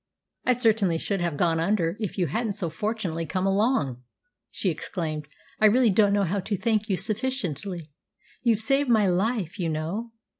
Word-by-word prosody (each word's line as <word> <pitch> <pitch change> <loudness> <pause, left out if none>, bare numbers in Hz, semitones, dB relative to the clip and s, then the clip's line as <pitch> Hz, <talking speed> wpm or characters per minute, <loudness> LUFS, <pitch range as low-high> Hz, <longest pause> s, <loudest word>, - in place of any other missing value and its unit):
"I 250 - +5
certainly 220 -8 +2
should 195 +3 -2
have 170 -4 -1
gone 165 -1 +2
under 170 -1 +1
if 210 -4 -4
you 180 - +2
hadn't 220 - -1
so 180 -5 -3
fortunately 190 -7 -2
come 185 0 -1
along!" 195 - +1 0.5
she 190 - -1
exclaimed. 155 -2 -4 0.3
"I 215 - +7
really 235 +1 +4
don't 205 +1 +4
know 200 0 +3
how 195 +3 0
to 200 +2 -2
thank 215 +1 0
you 190 - +1
sufficiently. 195 - -3 0.5
You've 235 -3 +3
actually - - -5 0.2
saved 285 -2 -1
my 220 -3 +4
life, 195 0 0
you 170 -2 0
know! 170 +10 -3
195 Hz, 180 wpm, -26 LUFS, 170-220 Hz, 0.5 s, I